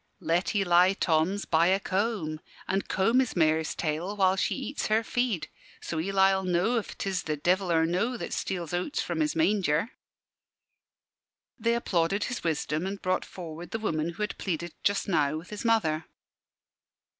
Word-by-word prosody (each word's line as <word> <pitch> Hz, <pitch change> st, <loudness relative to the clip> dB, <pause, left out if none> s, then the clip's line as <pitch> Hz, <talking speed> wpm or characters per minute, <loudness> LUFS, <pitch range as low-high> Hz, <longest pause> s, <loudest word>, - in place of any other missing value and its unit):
"Let 175 Hz, +5 st, 0 dB
Eli 180 Hz, -1 st, +5 dB
Thoms 180 Hz, +3 st, +1 dB
buy 165 Hz, +1 st, +3 dB
a 190 Hz, +1 st, +3 dB
comb, 190 Hz, -6 st, -1 dB, 0.3 s
an' 195 Hz, +1 st, +1 dB
comb 225 Hz, +8 st, +2 dB
his 260 Hz, -3 st, 0 dB
mare's 160 Hz, -2 st, +2 dB
tail 170 Hz, +6 st, -2 dB
while 190 Hz, -1 st, +4 dB
she 190 Hz, -, 0 dB
eats 270 Hz, +1 st, -3 dB
her 220 Hz, +1 st, +2 dB
feed. 240 Hz, -6 st, -1 dB, 0.3 s
So 160 Hz, -, -4 dB
Eli'll 190 Hz, +2 st, +3 dB
know 185 Hz, +6 st, +1 dB
if 215 Hz, -, -8 dB
'tis 190 Hz, -3 st, -1 dB
the 155 Hz, -1 st, -3 dB
devil 180 Hz, +4 st, +1 dB
or 160 Hz, -1 st, +4 dB
no 205 Hz, +9 st, 0 dB
that -, -, -5 dB
steals 175 Hz, -4 st, -3 dB
oats 180 Hz, +11 st, -1 dB
from -, -, -2 dB
his 305 Hz, -1 st, +1 dB
manger." 205 Hz, -, +2 dB, 1.7 s
They 230 Hz, +1 st, +2 dB
applauded 195 Hz, -3 st, 0 dB
his 245 Hz, -, -4 dB
wisdom 155 Hz, +1 st, -1 dB
and 195 Hz, +1 st, -4 dB
brought 185 Hz, 0 st, 0 dB
forward 170 Hz, -1 st, -8 dB
the -, -, -2 dB
woman 165 Hz, -7 st, -1 dB
who 210 Hz, -, -3 dB
had 210 Hz, -, -4 dB
pleaded 170 Hz, -2 st, -3 dB
just 200 Hz, 0 st, +1 dB
now 155 Hz, -5 st, +1 dB
with 165 Hz, +5 st, -10 dB
his 210 Hz, -, -5 dB
mother. 165 Hz, -9 st, +2 dB
185 Hz, 165 wpm, -28 LUFS, 165-210 Hz, 1.7 s, Eli